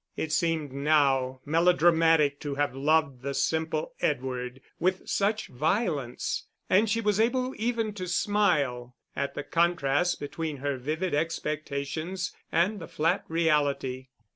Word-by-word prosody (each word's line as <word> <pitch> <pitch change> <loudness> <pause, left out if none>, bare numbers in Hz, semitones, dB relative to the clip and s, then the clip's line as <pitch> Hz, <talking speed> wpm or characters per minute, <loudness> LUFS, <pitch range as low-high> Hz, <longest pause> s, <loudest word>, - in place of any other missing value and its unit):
It 160 - -2
seemed 160 -4 0
now 135 -3 +2
melodramatic 165 -2 +4
to 145 -2 -4
have 145 -3 0
loved 145 -2 +1
the 140 +1 -3
simple 160 -1 -1
Edward 125 -2 -2 0.2
with 185 +1 0
such 210 +2 0
violence, 150 - -1 0.2
and 205 +4 +3
she 230 +2 +1
was 210 -1 +1
able 255 +3 +1
even 225 -1 -1
to 185 -3 -5
smile 150 - +1 0.2
at 140 - -2
the 145 - -3
contrast 170 0 +1
between 155 +1 -4
her 140 0 -2
vivid 155 +8 -2
expectations 155 +2 -2 0.2
and 185 +6 +2
the 165 - -8
flat 165 -1 0
reality. 145 -5 0
155 Hz, 130 wpm, -28 LUFS, 140-175 Hz, 0.2 s, melodramatic